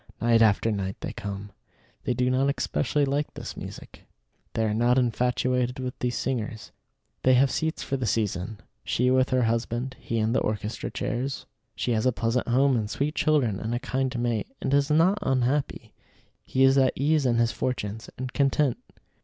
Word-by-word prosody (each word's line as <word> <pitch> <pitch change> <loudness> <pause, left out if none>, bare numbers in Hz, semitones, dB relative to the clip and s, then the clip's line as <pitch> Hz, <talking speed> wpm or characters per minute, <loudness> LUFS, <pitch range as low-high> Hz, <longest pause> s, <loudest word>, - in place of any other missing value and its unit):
Night 115 -1 +4
after 110 +1 +4
night 95 -2 -2
they - - -4
come. 100 -2 -6 0.5
They 125 - 0
do 125 +1 +1
not 135 +2 +2
especially 145 +2 0
like 140 +2 -1
this - - -7
music. - - -10 0.5
They 110 - +1
are 105 - 0
not 120 +3 +3
infatuated 125 +1 +1
with 130 -1 -4
these 125 0 -1
singers. 115 -4 -3 0.5
They 130 0 +5
have 130 +2 +4
seats 160 0 -2
for 135 - -2
the 125 -3 -2
season; 105 -1 -1 0.3
she 125 +1 +1
with 130 0 +3
her 130 -1 +2
husband, 120 +3 -1
he 115 - -3
in 110 +1 +1
the - - +3
orchestra 105 0 -3
chairs. 130 +3 -3 0.3
She 125 - -1
has 110 +1 +1
a - - +4
pleasant 115 +3 -1
home 130 +2 +3
and 110 -3 -1
sweet 145 +6 -1
children 140 - +2
and 115 +2 -2
a - - -1
kind 130 0 -2
mate, 120 -3 -1
and 135 - -1
is 140 0 +3
not 170 +7 +4
unhappy. 135 +2 0 0.5
He 130 - +2
is 135 +1 +6
at 130 -1 +3
ease 145 0 +2
in 120 - +2
his 115 -1 +2
fortunes, 110 -3 -3
and 130 0 -5
content. 140 -2 +2
125 Hz, 185 wpm, -26 LUFS, 115-135 Hz, 0.5 s, is